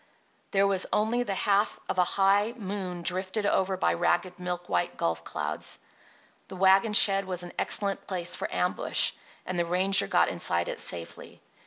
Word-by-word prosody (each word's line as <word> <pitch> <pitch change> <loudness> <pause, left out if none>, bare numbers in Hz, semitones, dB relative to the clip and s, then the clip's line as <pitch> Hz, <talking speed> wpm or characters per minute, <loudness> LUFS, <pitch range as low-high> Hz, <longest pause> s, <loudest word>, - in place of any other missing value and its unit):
There 195 0 +2
was 195 -2 +2
only 220 +3 +1
the 205 -5 -3
half 200 +2 +1
of 185 - -2
a - - +6
high 200 +5 +1
moon 190 -4 -5
drifted 185 +4 -2
over 190 -1 +1
by - - +1
ragged, 175 +1 -1
milk 180 0 -5
white 90 0 -1
gulf 85 0 -2
clouds. - - -5 0.7
The 190 - -9
wagon 195 +3 +3
shed 195 -1 +6
was 180 -1 -4
an 175 - -9
excellent 200 -1 0
place 175 -2 -1
for - - -4
ambush; - - +1 0.3
and 185 -1 -3
the 170 - +1
ranger 185 - +2
got - - +3
inside 85 0 0
it - - -5
safely. 85 -2 -8
190 Hz, 170 wpm, -27 LUFS, 175-200 Hz, 0.7 s, a